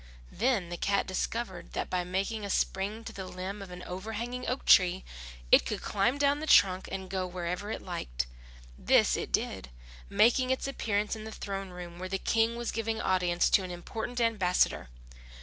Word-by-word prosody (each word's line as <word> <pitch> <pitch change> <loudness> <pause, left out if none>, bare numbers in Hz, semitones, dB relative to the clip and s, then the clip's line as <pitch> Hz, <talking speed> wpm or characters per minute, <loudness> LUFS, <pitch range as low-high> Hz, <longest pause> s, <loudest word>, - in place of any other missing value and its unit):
Then 220 -5 +1
the 175 - -4
cat 200 +2 +1
discovered 185 -1 -3
that - - -3
by 180 -1 +1
making 195 +4 -2
a 200 - -4
spring 200 +4 -1
to - - -8
the 190 -1 -6
limb 190 +3 -6
of 195 - -8
an 180 0 -8
overhanging 225 +7 -5
oak 255 - -2
tree, 185 0 +6 0.5
it - - +8
could 65 - -4
climb 220 +7 +1
down 285 0 +2
the 315 - -5
trunk 190 -7 +5
and 190 -1 -4
go 185 -1 -2
where 175 -1 -5 0.2
it - - -4
liked. - - -3 0.5
This - - +4
it - - -4
did, 65 - -1 0.4
making 235 +5 +4
its 260 +1 0
appearance 210 -6 -1
in 215 - -8
the 220 - -7
throne 195 -2 -5
room, 175 -1 -9
where 185 0 -5
the 195 - 0
King 225 +3 +1
was 235 -1 -3
giving 225 0 -2
audience 180 -3 +2
to - - +6
an 185 - -5
important 220 +7 -5
ambassador. 195 - +2
195 Hz, 185 wpm, -30 LUFS, 180-225 Hz, 0.5 s, it